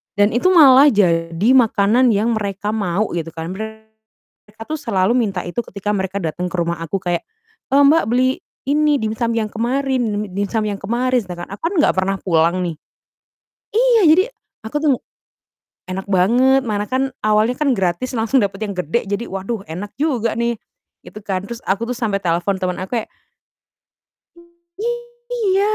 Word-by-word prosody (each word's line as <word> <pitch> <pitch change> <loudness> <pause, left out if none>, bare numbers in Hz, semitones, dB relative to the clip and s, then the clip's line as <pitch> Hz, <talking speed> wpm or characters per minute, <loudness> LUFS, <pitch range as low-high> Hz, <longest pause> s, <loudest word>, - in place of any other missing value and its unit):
dan 205 +1 +3
itu 240 +10 +1
malah 285 -5 +8
jadi 170 0 +1
makanan 235 0 +4
yang 220 +4 +1
mereka 205 +1 -3
mau 205 -1 -1
gitu 165 -1 -4
kan. 165 +2 -5
Mereka 220 +1 -12
tuh 310 0 -3
selalu 200 -7 +1
minta 200 -7 0
itu 175 +7 -4
ketika 200 +1 -4
mereka 190 0 -2
datang 170 +3 -2
ke 180 - -6
rumah 170 0 -1
aku 190 +4 -3
kayak, 175 -1 -1 0.5
"Eee, 280 - +5
Mbak, 305 +4 +5
beli 255 +2 +2 0.3
ini 300 +1 +3
dimsum 220 +2 -1
yang 215 -2 -1
kemarin 260 +3 0 0.3
dimsum 205 +2 -1
yang 200 -1 -3
kemarin," 245 +5 0
sedangkan 180 -5 -8
aku 210 +12 -3
kan - - -4
enggak - - +4
pernah 190 +1 +1
pulang 170 +1 +2
nih 170 -2 -3 1.0
iya, 470 0 +4
jadi 350 +5 +6 0.4
aku 220 +6 -5
tuh 300 -2 +3 0.9
enak 185 +1 -5
banget 245 +9 +4
mana 210 -1 -1
kan 265 +1 0
awalnya 215 +3 +2
kan 295 0 +1
gratis 190 +7 -1
langsung 225 +3 +2
dapat 195 0 -2
yang 200 - -5
gede, 180 +6 -2
jadi 205 +4 -3
waduh 195 +3 -4
enak 185 +6 -7
juga 250 -7 0
nih, 235 -1 -1 0.5
gitu 210 - -10
kan. 195 -1 -3
Terus 235 +2 -7
aku 200 +4 +1
tuh 250 - -2
sampai 220 -5 -1
telepon 175 +3 0
teman 180 -1 -2
aku 190 +6 -3
kayak - - -9 2.3
Iya? 410 -1 +2
215 Hz, 165 wpm, -19 LUFS, 190-255 Hz, 2.3 s, malah